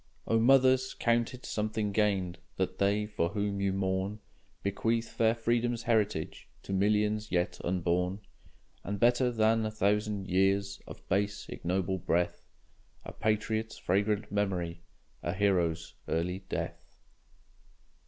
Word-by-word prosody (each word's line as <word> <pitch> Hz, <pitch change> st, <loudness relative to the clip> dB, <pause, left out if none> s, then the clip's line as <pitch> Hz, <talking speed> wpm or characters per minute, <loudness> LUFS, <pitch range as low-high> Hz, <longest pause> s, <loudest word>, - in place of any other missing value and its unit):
O 115 Hz, -, +2 dB
mothers! 130 Hz, +1 st, +4 dB
count 115 Hz, 0 st, +1 dB
it 125 Hz, -, -13 dB
something 110 Hz, -1 st, -1 dB
gained 100 Hz, -4 st, +1 dB, 0.2 s
That 95 Hz, 0 st, -2 dB
they, 100 Hz, +2 st, +2 dB
for 95 Hz, -5 st, -1 dB
whom 100 Hz, 0 st, -2 dB
you 100 Hz, -1 st, +2 dB
mourn, 95 Hz, +2 st, -1 dB, 0.4 s
Bequeath 115 Hz, +4 st, 0 dB
fair 115 Hz, 0 st, +2 dB
Freedom's 120 Hz, +1 st, 0 dB
heritage 105 Hz, -8 st, 0 dB
To 95 Hz, -, -5 dB
millions 105 Hz, +2 st, +1 dB
yet 90 Hz, 0 st, 0 dB
unborn; 90 Hz, +2 st, 0 dB, 0.6 s
And 100 Hz, +1 st, -3 dB
better 120 Hz, +2 st, +4 dB
than 110 Hz, -1 st, +2 dB
a 110 Hz, -, 0 dB
thousand 105 Hz, -1 st, 0 dB
years 95 Hz, +1 st, +1 dB
Of -, -, -11 dB
base, 100 Hz, +1 st, 0 dB
ignoble 95 Hz, +1 st, -1 dB
breath, 85 Hz, +1 st, 0 dB, 0.6 s
A -, -, -6 dB
patriot's 110 Hz, +1 st, -1 dB
fragrant 105 Hz, +2 st, 0 dB
memory, 90 Hz, -4 st, -1 dB, 0.4 s
A 85 Hz, -, -2 dB
hero's 90 Hz, -4 st, +1 dB
early 90 Hz, +4 st, -2 dB
death! -, -, -5 dB
100 Hz, 125 wpm, -30 LUFS, 95-110 Hz, 0.6 s, mothers